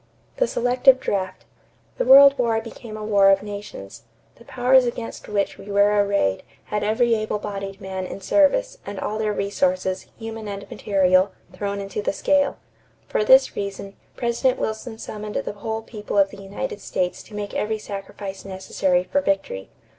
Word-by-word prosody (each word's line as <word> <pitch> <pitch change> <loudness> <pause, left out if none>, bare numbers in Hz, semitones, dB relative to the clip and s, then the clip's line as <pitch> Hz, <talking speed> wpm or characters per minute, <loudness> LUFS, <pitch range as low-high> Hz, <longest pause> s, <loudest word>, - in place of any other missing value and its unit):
=The - - +2
Selective 250 - +4
Draft.= 190 -6 -3 0.5
The - - +1
World 275 +1 +9
War 230 -2 +2
became 225 -1 -9
a 215 - -6
war 200 -2 +5
of 195 0 +4
nations. 200 - -8 0.4
The 235 - -17
powers 250 +1 +4
against 235 -1 -5
which 200 -1 -1
we 205 - -11
were 205 +1 +4
arrayed 200 - +1 0.2
had 210 -1 -3
every 225 +3 +2
able 215 -1 -1
bodied 195 -1 -6
man 190 -2 -5
in - - -7
service 305 - +2
and 200 -1 -6
all 215 +1 -3
their 215 -1 0
resources, 205 -1 -1
human 225 -1 -7
and 200 -1 -6
material, 185 -1 +2 0.2
thrown 200 +2 -3
into 195 +1 -4
the 205 - -1
scale. 280 +5 +2 0.5
For - - +1
this 265 +5 +6
reason, 200 0 -5 0.2
President 245 +2 0
Wilson 220 +1 -4
summoned 210 -1 -7
the - - -2
whole 220 +2 -4
people 210 -2 -5
of 195 -1 +4
the 200 - -11
United 200 +3 -5
States 180 -1 -2
to 210 - -13
make 205 -1 -5
every 220 +1 -1
sacrifice 195 -1 -7
necessary 190 -1 0
for 285 +9 0
victory. 195 - -2
210 Hz, 170 wpm, -23 LUFS, 195-230 Hz, 0.5 s, World